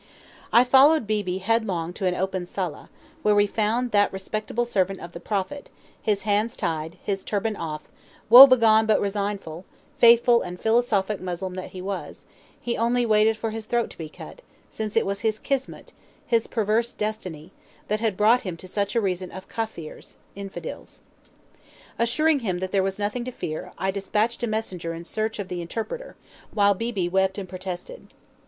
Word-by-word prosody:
I 240 Hz, -, +7 dB
followed 270 Hz, +2 st, +5 dB
Beebe 205 Hz, -4 st, -1 dB
headlong 190 Hz, -5 st, -1 dB
to 190 Hz, 0 st, -2 dB
an 180 Hz, -, +1 dB
open 190 Hz, -1 st, -2 dB
sala, 180 Hz, -4 st, -5 dB, 0.3 s
where 210 Hz, -5 st, +3 dB
we 205 Hz, 0 st, +5 dB
found 225 Hz, +4 st, 0 dB
that 205 Hz, -1 st, +3 dB
respectable 215 Hz, +4 st, -3 dB
servant 195 Hz, -4 st, 0 dB
of 170 Hz, -, -9 dB
the 170 Hz, -, -8 dB
Prophet, 210 Hz, +10 st, -3 dB, 0.3 s
his 205 Hz, -3 st, 0 dB
hands 210 Hz, +2 st, 0 dB
tied, 160 Hz, +1 st, -3 dB
his 195 Hz, -2 st, -2 dB
turban 210 Hz, +1 st, -1 dB
off, 155 Hz, -4 st, -5 dB, 0.4 s
woe 250 Hz, +5 st, +12 dB
begone 220 Hz, -4 st, +5 dB
but 215 Hz, -, +4 dB
resigned; 200 Hz, 0 st, -2 dB, 0.6 s
faithful 235 Hz, 0 st, +6 dB
and 180 Hz, 0 st, -6 dB
philosophic 220 Hz, -3 st, +1 dB
Moslem 185 Hz, 0 st, -4 dB
that 185 Hz, 0 st, -6 dB
he 185 Hz, -1 st, -8 dB
was, 195 Hz, 0 st, -6 dB, 0.3 s
he 240 Hz, -, -2 dB
only 240 Hz, +2 st, +1 dB
waited 215 Hz, 0 st, +3 dB
for 225 Hz, 0 st, -3 dB
his 220 Hz, 0 st, -6 dB
throat 240 Hz, 0 st, 0 dB
to -, -, -14 dB
be 160 Hz, -2 st, -6 dB
cut, -, -, -11 dB, 0.3 s
since 215 Hz, -1 st, -5 dB
it 225 Hz, -, +3 dB
was 200 Hz, 0 st, -2 dB
his 220 Hz, -1 st, 0 dB
kismut, 270 Hz, +3 st, -4 dB, 0.3 s
his 230 Hz, -2 st, +1 dB
perverse 225 Hz, +1 st, 0 dB
destiny, 185 Hz, -6 st, -5 dB, 0.4 s
that 210 Hz, +1 st, 0 dB
had 220 Hz, -4 st, -1 dB
brought 225 Hz, +4 st, +4 dB
him 180 Hz, -4 st, -5 dB
to 185 Hz, -, -11 dB
such 200 Hz, +3 st, -2 dB
a 230 Hz, -, +3 dB
region 185 Hz, -2 st, -2 dB
of 190 Hz, 0 st, -9 dB
Kafirs, 220 Hz, -9 st, -6 dB, 0.2 s
(infidels). 195 Hz, -1 st, -8 dB, 1.0 s
Assuring 290 Hz, +6 st, +2 dB
him 190 Hz, -7 st, -2 dB
that 185 Hz, +1 st, -4 dB
there 195 Hz, -, +2 dB
was 195 Hz, 0 st, -2 dB
nothing 210 Hz, +4 st, -2 dB
to 255 Hz, -, -4 dB
fear, 155 Hz, -9 st, -5 dB
I 190 Hz, -, 0 dB
despatched 210 Hz, +4 st, -1 dB
a 240 Hz, -, 0 dB
messenger 185 Hz, -7 st, -3 dB
in 170 Hz, +1 st, -9 dB
search 220 Hz, +3 st, -2 dB
of 200 Hz, -3 st, -5 dB
the 180 Hz, -2 st, -4 dB
interpreter, 230 Hz, -, -5 dB, 0.4 s
while 205 Hz, -1 st, +4 dB
Beebe 205 Hz, -3 st, -2 dB
wept 190 Hz, +2 st, +1 dB
and 195 Hz, -2 st, -5 dB
protested. 185 Hz, -, -7 dB
205 Hz, 175 wpm, -24 LUFS, 185-230 Hz, 1.0 s, woe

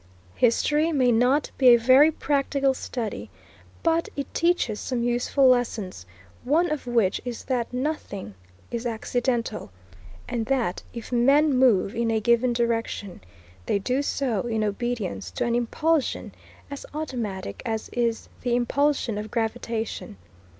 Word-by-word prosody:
History 295 Hz, +7 st, +2 dB
may 255 Hz, -5 st, +3 dB
not 250 Hz, +5 st, +2 dB
be 260 Hz, -, +5 dB
a 240 Hz, -1 st, +9 dB
very 260 Hz, +6 st, +6 dB
practical 275 Hz, -2 st, 0 dB
study, 240 Hz, -4 st, -5 dB, 0.5 s
but 330 Hz, 0 st, +1 dB
it 280 Hz, -, -5 dB
teaches 335 Hz, -11 st, +1 dB
some 245 Hz, -2 st, -2 dB
useful 245 Hz, +3 st, +2 dB
lessons, 220 Hz, -, 0 dB, 0.4 s
one 320 Hz, +7 st, +2 dB
of 300 Hz, -4 st, -3 dB
which 230 Hz, -6 st, +1 dB
is 245 Hz, -2 st, -6 dB
that 245 Hz, -3 st, -2 dB
nothing 250 Hz, -, -4 dB, 0.4 s
is 240 Hz, 0 st, -2 dB
accidental, 235 Hz, -, -2 dB, 0.6 s
and 230 Hz, -2 st, -3 dB
that 250 Hz, -9 st, 0 dB
if 235 Hz, 0 st, -8 dB
men 275 Hz, +5 st, +4 dB
move 235 Hz, -7 st, +3 dB
in 235 Hz, 0 st, 0 dB
a 225 Hz, -1 st, +1 dB
given 235 Hz, +2 st, +3 dB
direction, 230 Hz, -, -2 dB, 0.5 s
they -, -, +2 dB
do 255 Hz, +7 st, 0 dB
so 255 Hz, -7 st, -1 dB
in 220 Hz, -2 st, 0 dB
obedience 205 Hz, -, -3 dB
to 85 Hz, -, -2 dB
an 235 Hz, -, 0 dB
impulsion 280 Hz, +6 st, 0 dB, 0.4 s
as 280 Hz, -, -6 dB
automatic 235 Hz, -11 st, -4 dB
as 225 Hz, -3 st, -3 dB
is 235 Hz, -2 st, -1 dB
the 245 Hz, -1 st, 0 dB
impulsion 245 Hz, -2 st, +1 dB
of 215 Hz, +1 st, -6 dB
gravitation. 225 Hz, -, -3 dB
240 Hz, 135 wpm, -25 LUFS, 225-270 Hz, 0.6 s, a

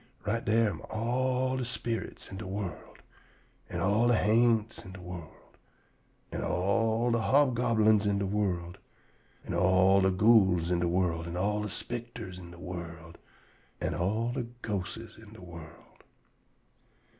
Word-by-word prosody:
Right 115 Hz, +2 st, 0 dB
dar 115 Hz, +1 st, +3 dB
am 90 Hz, -6 st, -4 dB
all 130 Hz, +3 st, 0 dB
de 130 Hz, -, -1 dB
sperits 115 Hz, -3 st, -4 dB
in 95 Hz, -, -6 dB
de 105 Hz, -1 st, -6 dB
world, 95 Hz, -1 st, -6 dB, 0.7 s
an' -, -, -3 dB
all 105 Hz, +5 st, +3 dB
de 120 Hz, -, +4 dB
ha'nts 110 Hz, 0 st, +2 dB
in 95 Hz, -, -10 dB
de 95 Hz, -, -10 dB
world, 90 Hz, -3 st, -11 dB, 0.7 s
an' -, -, -3 dB
all 110 Hz, +5 st, +1 dB
de 115 Hz, -, +2 dB
hobgoblins 115 Hz, -3 st, +3 dB
in 100 Hz, 0 st, +2 dB
de 100 Hz, -, 0 dB
world, 95 Hz, -4 st, -2 dB, 0.7 s
an' -, -, -4 dB
all 95 Hz, +3 st, +4 dB
de 95 Hz, -, +4 dB
ghouls 95 Hz, -4 st, +4 dB
in 90 Hz, -, +2 dB
de 85 Hz, -, +1 dB
world, 85 Hz, -2 st, 0 dB
an' 85 Hz, +1 st, -4 dB
all 105 Hz, +3 st, 0 dB
de 105 Hz, -, -3 dB
spicters 115 Hz, -3 st, -6 dB
in 85 Hz, -1 st, -10 dB
de 85 Hz, -, -12 dB
world, 85 Hz, -2 st, -8 dB, 0.6 s
an' -, -, -1 dB
all 110 Hz, +7 st, 0 dB
de 125 Hz, -2 st, -3 dB, 0.2 s
ghostes 110 Hz, +2 st, -4 dB
in 110 Hz, -1 st, -14 dB
de 110 Hz, -, -13 dB
world. 85 Hz, -2 st, -13 dB
105 Hz, 155 wpm, -30 LUFS, 90-115 Hz, 0.7 s, de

